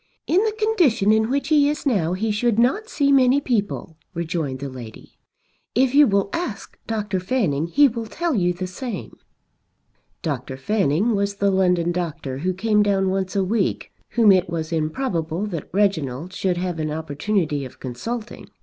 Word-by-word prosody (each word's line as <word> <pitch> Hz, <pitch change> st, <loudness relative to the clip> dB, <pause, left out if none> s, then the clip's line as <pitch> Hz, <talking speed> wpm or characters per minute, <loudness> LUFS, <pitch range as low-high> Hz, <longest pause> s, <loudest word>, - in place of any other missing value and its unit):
"In 370 Hz, +5 st, +3 dB
the 435 Hz, -, +1 dB
condition 355 Hz, -, +2 dB
in 220 Hz, +1 st, +2 dB
which 275 Hz, +1 st, -1 dB
he 290 Hz, -2 st, +4 dB
is 300 Hz, +1 st, -3 dB
now 185 Hz, -, +1 dB
he 215 Hz, +4 st, -1 dB
should 225 Hz, +1 st, +1 dB
not 270 Hz, -, +2 dB
see 280 Hz, -1 st, +1 dB
many 265 Hz, 0 st, +5 dB
people," 205 Hz, -, -2 dB, 0.2 s
rejoined 160 Hz, -5 st, -2 dB
the 140 Hz, +2 st, -5 dB
lady. 125 Hz, -4 st, -11 dB, 0.6 s
"If 255 Hz, +1 st, +3 dB
you 290 Hz, 0 st, +7 dB
will 200 Hz, -1 st, +1 dB
ask 265 Hz, -, -4 dB
Dr. 210 Hz, -4 st, -2 dB
Fanning 180 Hz, -, 0 dB
he 285 Hz, +11 st, +5 dB
will 230 Hz, -2 st, -4 dB
tell 340 Hz, +6 st, -2 dB
you 180 Hz, -6 st, +2 dB
the 180 Hz, +1 st, -4 dB
same." 215 Hz, +4 st, -6 dB, 1.1 s
Dr. 135 Hz, -5 st, -3 dB
Fanning 195 Hz, -, +1 dB
was 200 Hz, 0 st, -1 dB
the 200 Hz, 0 st, +1 dB
London 180 Hz, -2 st, +2 dB
doctor 155 Hz, -7 st, -4 dB
who 180 Hz, +5 st, 0 dB
came 210 Hz, +2 st, +2 dB
down 195 Hz, -2 st, +2 dB
once 190 Hz, 0 st, -2 dB
a 195 Hz, -, +2 dB
week, 200 Hz, +1 st, -1 dB, 0.2 s
whom 220 Hz, -2 st, +6 dB
it 185 Hz, -2 st, +3 dB
was 160 Hz, -1 st, -3 dB
improbable 165 Hz, +1 st, -1 dB
that 170 Hz, -8 st, -5 dB
Reginald 175 Hz, -5 st, 0 dB
should 185 Hz, -2 st, -1 dB
have 175 Hz, -2 st, -3 dB
an 155 Hz, -1 st, -1 dB
opportunity 155 Hz, 0 st, -1 dB
of 130 Hz, -, -10 dB
consulting. 215 Hz, -, -6 dB
195 Hz, 170 wpm, -22 LUFS, 165-235 Hz, 1.1 s, you